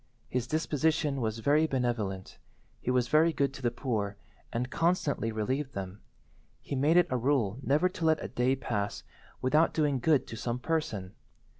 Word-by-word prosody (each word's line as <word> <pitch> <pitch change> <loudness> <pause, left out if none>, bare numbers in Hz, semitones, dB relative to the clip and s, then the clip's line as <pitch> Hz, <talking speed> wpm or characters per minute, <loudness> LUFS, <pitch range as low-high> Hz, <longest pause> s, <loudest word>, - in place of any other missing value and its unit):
His 125 -1 -1
disposition 155 -1 0
was 110 -1 -1
very 145 +7 +3
benevolent. 120 -8 -2 0.4
He - - -4
was 125 -1 +2
very 155 +5 +4
good 140 -3 0
to 140 - -9
the 120 - +2
poor, 105 -6 -2 0.3
and 125 +2 -2
constantly 160 -9 +1
relieved 130 +6 -2
them. 95 +1 -6 0.6
He - - -7
made 150 +6 +3
it 175 - +6
a 130 - +2
rule 125 -4 +1
never 145 +6 +3
to 180 -2 -4
let 160 -1 +3
a - - -3
day 125 +2 +1
pass 105 -6 -3 0.4
without 150 +6 +3
doing 145 -4 +2
good 150 +2 +3
to - - -8
some 120 +2 -2
person. 125 - -2
130 Hz, 170 wpm, -30 LUFS, 115-150 Hz, 0.6 s, it